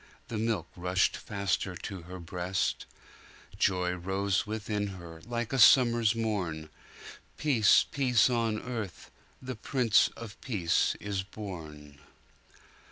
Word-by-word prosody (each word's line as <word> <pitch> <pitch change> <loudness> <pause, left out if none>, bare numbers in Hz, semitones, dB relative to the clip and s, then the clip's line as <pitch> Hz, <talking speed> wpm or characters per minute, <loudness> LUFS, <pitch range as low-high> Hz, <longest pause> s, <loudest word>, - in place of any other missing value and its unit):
The 110 - -3
milk 110 -6 -1
rushed 90 +1 +1
faster 100 -2 -2
to 95 +1 -7
her 90 +2 -9
breast:Joy 90 +1 -3
rose 95 +3 -1
within 105 -1 -2
her, 85 -2 -11
like 120 0 -3
a 135 - +1
summer's 120 -2 +6
morn; 90 -9 -2 0.7
Peace, 125 -9 +4
peace 130 -5 +3
on 115 -3 0
earth! 110 -8 -6 0.3
the 130 0 -5
Prince 115 0 +3
of 115 -1 -9
Peace 95 -10 +1
is 100 -2 -2
born. 80 -8 -9
100 Hz, 110 wpm, -30 LUFS, 90-115 Hz, 0.7 s, summer's